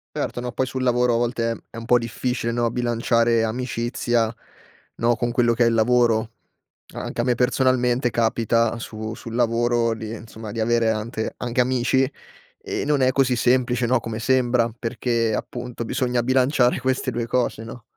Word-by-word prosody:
Certo 120 - -3
no, 125 - -4
poi 130 +1 -1
sul 130 0 -3
lavoro 125 -1 +2
a - - +2
volte 115 -2 -1
è - - -14
un 115 - -7
po' 120 +1 +5
difficile 115 0 -2
no, 120 0 0
bilanciare 115 -1 +1
amicizia, 120 -1 -1 0.7
no, 120 +1 +2
con 120 +1 -1
quello 120 -1 +2
che 120 - +3
è - - +4
il 115 - +2
lavoro. 115 -1 +2 0.6
Anche - - -4
a 120 - +1
me 125 -1 +2
personalmente 125 0 +2
capita 115 0 +1
su 110 -1 -6
sul 115 -1 -8
lavoro 120 0 +1
di 110 -1 -6
insomma, 110 -1 -9
di 115 - -3
avere 115 0 +2
ante 110 +1 -4
anche 120 +1 -1
amici 130 +1 +2 0.5
e - - -4
non 145 -2 +1
è 130 0 +4
così 130 -2 +2
semplice 125 0 +2
no, 125 0 +2
come 110 -1 -5
sembra, 120 0 +2
perché 115 -1 -1
appunto 120 0 -5
bisogna 125 0 0
bilanciare 130 0 +2
queste 130 0 -1
2 115 0 -3
cose, 120 -2 -1
no. 115 +1 -10
120 Hz, 175 wpm, -23 LUFS, 115-125 Hz, 0.7 s, po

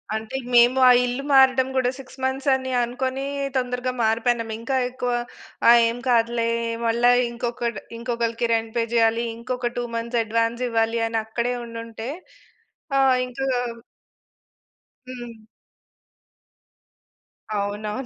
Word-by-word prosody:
అంటే 220 +4 -5 0.2
మేము 240 +2 +6
ఆ - - +9
ఇల్లు 245 +3 -3
మారడం 265 -1 +5
గూడా 255 -1 +2
6 265 0 -13
మంత్స్ 265 +1 -1
అని 260 0 -2
అనుకోని 260 +3 -2 0.3
తొందరగా 250 0 -1
మారిపోయినము. 225 0 +1
ఇంకా 265 +4 -2
ఎక్కువ 250 -1 -3 0.6
ఆహ్, 235 0 +8
ఏం 230 - -2
కాదులే, 235 0 +2 0.4
మళ్ళా 235 +2 +4 0.2
ఇంకొక 235 0 -3 0.3
ఇంకొకళ్ళకి 235 0 -1
రెంట్ 225 0 -1
పే 230 - +2
జేయాలి, 230 0 +3
ఇంకొక 245 0 -3
2 245 - -1
మంత్స్ 235 +1 -1
అడ్వాన్స్ 230 +2 -1
ఇవ్వాలి, 225 0 +1
అని 225 0 -1
అక్కడే 235 +2 -2
ఉండుంటే 230 +1 -7 0.9
ఆహ్, 265 -1 +5
ఇంకా 260 +2 -4 1.7
హ్మ్. 230 -3 -10 2.1
అవునవును. 210 +4 -3
235 Hz, 115 wpm, -23 LUFS, 230-255 Hz, 2.1 s, ఆ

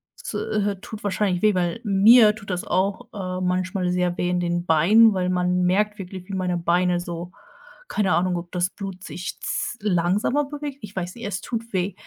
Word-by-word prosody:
Es, - - -7
äh, 205 -1 -1
tut 220 -1 -9
wahrscheinlich 195 -3 0
weh, 215 -1 +4
weil 180 +5 -1
mir 210 +2 +6
tut 205 -2 -12
das 180 -1 -2
auch, 190 +2 -1
ähm, 185 -2 -3
manchmal 185 0 -1
sehr 180 -1 0
weh 180 - 0
in 180 0 +1
den 175 0 -1
Beinen, 205 +8 +6
weil 180 -1 0
man 180 0 +1
merkt 210 +4 +1
wirklich, 185 0 -8
wie 200 - -7
meine 180 -2 -1
Beine 175 +1 +1
so 175 0 -6 0.6
keine 195 -3 +1
Ahnung, 180 +1 +1
ob 170 0 -7
das 180 +1 0
Blut 195 -3 -7
sich 180 0 -6
z 235 - -3
langsamer 205 +9 +1
bewegt. 290 -1 -6
Ich 205 -1 -10
weiß 180 -1 -3
nicht, 235 - -8
es 200 -1 -3
tut 230 -1 -5
weh. 185 0 0
185 Hz, 200 wpm, -23 LUFS, 180-210 Hz, 0.6 s, mir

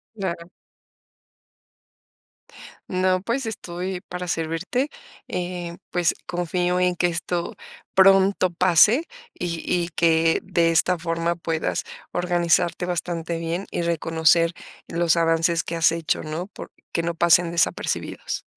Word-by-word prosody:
Claro. 175 -4 -4 2.4
No, 185 0 +1
pues, 235 +6 -2
estoy 185 -3 -4
para 180 0 -7
servirte, 170 - -1 0.4
eh, 175 -1 -4
pues, 175 -2 +1
confío, 180 +1 -1
en 180 -1 +2
que 175 - +2
esto 175 0 -3 0.4
pronto 195 0 +5
pase. 185 - +4 0.3
Y 170 -1 -3
y 175 -1 0
que 165 -1 +3
de 170 -3 +2
esta 180 +2 +3
forma 165 0 -1
puedas 165 -1 -2 0.3
organizarte 175 0 +1
bastante 170 -1 -3
bien, 170 +3 -3
y - - -2
reconocer 165 0 +2 0.3
los 170 0 +1
avances 165 0 +2
que 170 - -4
has 165 -1 +4
hecho, 165 -1 -1
¿no? 155 +4 -4
Por - - -11 0.2
Que 170 - 0
no 170 0 -1
pasen 170 0 +4
desapercibidos. 170 -1 -1
175 Hz, 120 wpm, -23 LUFS, 165-180 Hz, 2.4 s, pronto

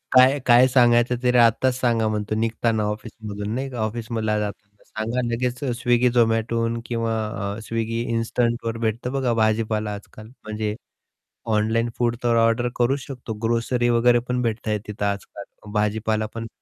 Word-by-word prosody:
काय 130 +3 +7
काय 125 +1 +7
सांगायचं 120 -1 +4
तरी 125 0 +3
आत्ताच 125 +2 +3
सांगा 115 -3 +2
म्हणतो 110 0 -2
निघताना 115 0 0
ऑफिसमधून 105 -1 -6
नाही 135 +1 -3
का, 125 - -8
ऑफिसमधला 110 -1 -2
जाताना 105 0 -7
सांगा 115 +3 -3
लगेच 125 +1 -1
Swiggy, 120 -1 +2
Zomatoहून 115 0 +1
किंवा 115 -1 -1 0.4
अ, - - -7
Swiggy 115 0 -2
इन्स्टंटवर 115 0 -1
भेटतं 115 +2 -2
बघा 130 -3 +1
भाजीपाला 110 -1 +1
आज-काल. 105 +1 -11 0.2
म्हणजे 110 0 -3 0.8
ऑनलाईन 115 +2 +1
फूड 120 -1 +1
तर 120 -1 +3
ऑर्डर 115 +2 +2
करू 125 +3 +2
शकतो, 130 -4 -7
ग्रोसरी 120 +1 +1
वगैरे 120 +1 +4
पण 125 0 0
भेटत 115 -1 -2
आहे 105 0 +1
तिथं 105 -1 -3
आज-काल. 100 0 -4 0.3
भाजीपालापण 110 +1 -1
115 Hz, 145 wpm, -23 LUFS, 110-120 Hz, 0.8 s, काय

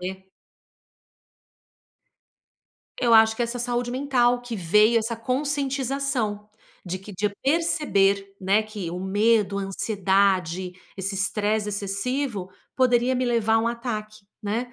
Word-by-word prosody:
E 190 +1 -7 2.7
Eu 240 -2 +2
acho 220 0 +6
que 240 - 0
é - - +2
essa 235 +1 -4
saúde 245 0 -1
mental, 245 -2 +1
que 245 -2 -6
veio 210 +6 +4
essa 230 +1 -2
conscientização, 265 -3 -1 0.4
de 185 0 -4
que 195 +2 -11
de 200 +3 -1
eu - - -1
perceber, 200 -11 +1
né, 195 +3 +2
que 210 -5 -6
o 175 - -5
medo, 205 +1 +1
a - - -2
ansiedade, 190 -3 0 0.2
esse 195 +1 -2
estresse 210 +2 0
excessivo, 205 +1 -2 0.2
poderia 250 0 +3
me 255 0 0
levar 230 -2 +2
a - - +5
um 225 +1 +1
ataque, 215 -3 -5 0.2
né? 230 +4 -3
215 Hz, 135 wpm, -24 LUFS, 195-245 Hz, 2.7 s, acho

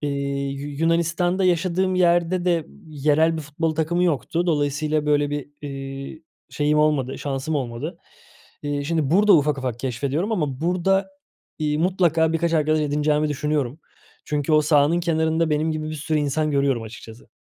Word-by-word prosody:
İii, 140 -1 -2
Yu 145 - -5
Yunanistan'da 170 +3 +1
yaşadığım 185 +1 +1
yerde 175 0 +2
de 170 -3 +1 0.2
yerel 155 +2 +2
bir 160 - -4
futbol 155 +2 -2
takımı 170 +3 0
yoktu. 170 +1 0
Dolayısıyla 150 -1 0
böyle 145 -1 +2
bir, 145 -1 -4
eee, 135 +2 -7 0.3
şeyim 150 0 +1
olmadı 150 -4 +1
şansım 140 +2 -3
olmadı. 120 -5 -4 0.6
Eee, 145 -1 -2
şimdi 155 -2 0
burada 205 +4 +5
ufak 145 -1 +1
ufak 125 -3 -3
keşfediyorum 140 - -2
ama 150 -10 -2
burada, 185 +3 +1 0.5
iii, 150 -1 0
mutlaka 165 -2 +2
birkaç 165 +1 0
arkadaş 155 -1 +2
edineceğimi 150 +1 +1
düşünüyorum. 145 -1 -2 0.4
Çünkü 150 +1 -1
o 155 - +6
sahanın 150 +2 +3
kenarında 160 -1 +1
benim 155 +2 +1
gibi 155 0 -4
bir - - -4
sürü 155 +1 -1
insan 150 +1 0
görüyorum 140 -4 +1
açıkçası. 110 +1 -11
155 Hz, 150 wpm, -23 LUFS, 145-165 Hz, 0.6 s, o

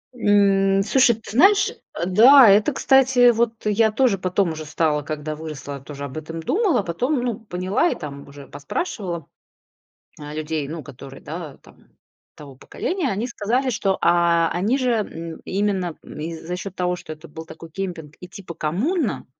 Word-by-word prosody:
М. 195 -3 +3
Слушай, 240 +1 +4
ты 225 - -12
знаешь, 390 - +5
э, 170 - -7
да, 235 +6 +8
это, 210 +8 +4
кстати, 265 -3 +5
вот 230 0 +1
я 215 +1 +3
тоже 230 -3 +2
потом 185 -1 0
уже 155 0 -7
стала, 150 -1 0
когда 155 +1 -5
выросла, 145 -3 -7
тоже 140 0 -8
об 140 +3 -8
этом 160 +1 -6
думала, 375 - +1
потом, 245 - -1
ну, 240 -3 -2
поняла 190 - -1
и - - -2
там 140 -4 -8
уже 140 -1 -12
поспрашивала, 170 - -4 1.0
а, 150 0 -8
людей, 155 -1 -3
ну, 160 -1 -6
которые, 135 +1 -12
да, 160 -3 -8
там - - -21 0.5
того 140 -3 -12
поколения, 350 - -3
они 210 +5 -2
сказали, 245 +3 -1
что, 195 -3 0
а, 170 -1 +3
они 205 +10 0
же, 255 -2 0
м, 170 -7 -4
именно, 190 -4 -1
м, - - -11
и 165 +2 -4
за 165 +2 -6
счёт 190 0 -7
того, 180 0 -1
что 155 - -9
это 155 +2 -11
был 160 +2 -9
такой 165 +1 -11
кемпинг 165 -5 -6
и, 180 - -10
типа, 180 -2 -10
коммуна, 215 - -1
180 Hz, 175 wpm, -22 LUFS, 155-225 Hz, 1.0 s, да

